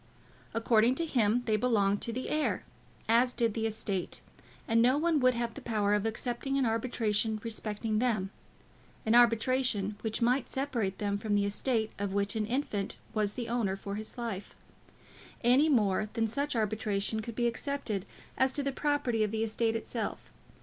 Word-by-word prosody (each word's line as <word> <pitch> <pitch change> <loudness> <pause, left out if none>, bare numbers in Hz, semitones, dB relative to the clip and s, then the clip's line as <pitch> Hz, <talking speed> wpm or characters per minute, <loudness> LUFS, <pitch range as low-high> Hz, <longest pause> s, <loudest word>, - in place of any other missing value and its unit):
According 230 +1 +4
to 335 - 0
him 245 -5 +2
they 215 -2 +2
belonged 205 -4 +2
to 235 - -1
the 255 +3 -4
heir, 305 0 0 0.4
as 240 +3 +4
did 230 -3 +1
the 225 0 0
estate; 200 -4 -3 0.5
and 230 0 +4
no 255 +4 +4
one 320 0 +2
would 255 -1 +4
have 235 -1 -2
the 280 - -9
power 210 -4 +1
of 210 +1 +1
accepting 245 +4 -2
an 270 - +2
arbitration 225 -2 0
respecting 215 -1 -2
them, 215 -6 0 0.7
an 220 - +2
arbitration 235 -3 +3
which 220 -1 -2
might 250 +2 +2
separate 245 -8 -2
them 200 -1 -1
from 210 0 0
the 200 0 +2
estate 220 +2 0
of 200 -1 -2
which 200 0 0
an 215 -1 -1
infant 235 -6 -2 0.2
was 210 -2 +1
the 240 -2 -4
owner 230 -5 0
for 200 0 -6
his 215 +3 -6
life, 225 -5 -5 0.9
any 260 +6 +5
more 215 -5 +2
than 225 - +1
such 280 +6 -1
arbitration 215 -1 -1
could 230 0 -7
be 240 - 0
accepted 235 -5 -2 0.3
as 265 +1 +4
to 285 - -1
the 275 - 0
property 265 -6 0
of 210 - 0
the 220 +1 -1
estate 225 +1 0
itself. 225 -1 -4
225 Hz, 175 wpm, -31 LUFS, 210-250 Hz, 0.9 s, any